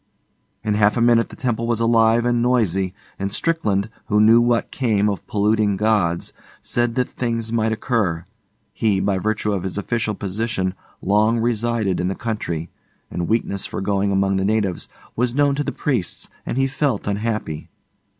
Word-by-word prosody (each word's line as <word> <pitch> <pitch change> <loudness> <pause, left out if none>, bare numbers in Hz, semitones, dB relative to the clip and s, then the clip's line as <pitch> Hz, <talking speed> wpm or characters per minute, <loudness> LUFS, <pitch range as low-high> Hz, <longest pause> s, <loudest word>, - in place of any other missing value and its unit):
In 105 - 0
half 105 +2 +3
a - - +2
minute 115 -1 +4
the - - -10
temple 115 -2 -1
was 115 -1 +1
alive 115 0 +4
and 120 -1 +2
noisy, 100 -7 +1 0.2
and 100 0 -2
Strickland, 105 -11 0 0.2
who 105 0 +2
knew 115 +2 +7
what 120 -1 +1
came 110 -6 +1
of 100 -4 -3
polluting 105 -1 +2
gods, 100 -5 +1 0.3
said 120 -1 -1
that 125 -1 +1
things 115 -2 -3
might 110 -1 +1
occur. 105 -7 -1 0.5
He, 105 -4 +1
by 95 0 +1
virtue 105 +1 0
of 95 - -1
his 95 +1 -4
official 110 +1 -1
position, 100 -1 -2 0.3
long 105 +4 +3
residence 115 -4 0
in 90 - 0
the 95 - -2
country, 85 -8 -3 0.4
and 85 -1 -2
weakness 105 -3 -1
for - - -5
going 100 0 0
among 95 0 +2
the 95 - 0
natives, 100 -4 0 0.3
was 125 +1 0
known 145 0 +3
to 145 +1 -1
the - - -2
priests 120 -12 -2 0.2
and - - -2
he 135 - +3
felt 135 -4 -1
unhappy. 100 -6 -3
110 Hz, 170 wpm, -21 LUFS, 100-115 Hz, 0.5 s, knew